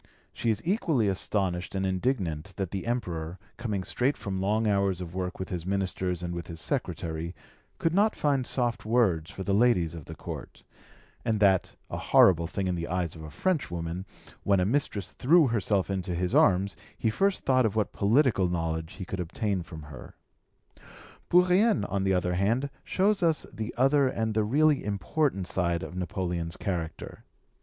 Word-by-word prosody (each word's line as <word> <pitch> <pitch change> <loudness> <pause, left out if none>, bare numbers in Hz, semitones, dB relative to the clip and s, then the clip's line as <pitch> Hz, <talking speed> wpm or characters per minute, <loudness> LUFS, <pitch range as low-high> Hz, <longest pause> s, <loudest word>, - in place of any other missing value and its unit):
She 115 - -1
is 110 -1 0
equally 165 - +1
astonished 95 -2 -1
and 95 0 0
indignant 95 - -1
that 95 -3 -3
the 100 +3 -4
Emperor, 90 -8 -3 0.2
coming 105 -5 -2
straight 130 +8 0
from 95 -2 -4
long 105 +3 +1
hours 100 -3 +1
of 85 -2 -6
work 90 0 -3
with 95 - -5
his 90 -3 -3
ministers 95 -2 -2
and 85 0 -3
with 85 -1 -5
his 80 -1 -7
secretary, 80 +1 -3 0.4
could 165 - 0
not 210 +4 +3
find 140 -4 +1
soft 120 -2 -1
words 105 -9 +2
for 95 - -6
the 100 - 0
ladies 100 -7 +3
of 80 -4 -8
the - - -8
Court, - - -8 0.6
and 110 -2 0
that, 95 -3 +3
a - - -5
horrible 85 -3 +5
thing 95 +3 -3
in 90 - 0
the 85 -1 -3
eyes 90 -3 -1
of 80 - -10
a 75 - -7
Frenchwoman, 90 - -2 0.3
when 100 -1 +3
a 90 - +2
mistress 105 - -1
threw 160 +5 +4
herself 100 -3 0
into 90 -2 -2
his 90 +1 -1
arms, 95 +1 +4 0.2
he 110 - +1
first 195 - +1
thought 130 -3 +4
of 105 - -5
what 105 -3 0
political 110 -2 +3
knowledge 80 0 -2
he 95 - -7
could 95 - -5
obtain 95 +2 -1
from 80 -2 -9
her. 75 -3 -11 1.1
Bourrienne, 180 +5 +4
on 100 -1 -1
the 95 - +3
other 90 0 0
hand, 115 +10 +1
shows 200 +1 +1
us 165 -3 +2
the 110 +1 -4
other 135 +2 +4
and 110 -3 -1
the 110 0 +2
really 145 +6 +3
important 100 - 0
side 85 -2 0
of 90 - -7
Napoleon's 90 -2 -3
character. 85 -5 -4
95 Hz, 180 wpm, -28 LUFS, 90-120 Hz, 1.1 s, horrible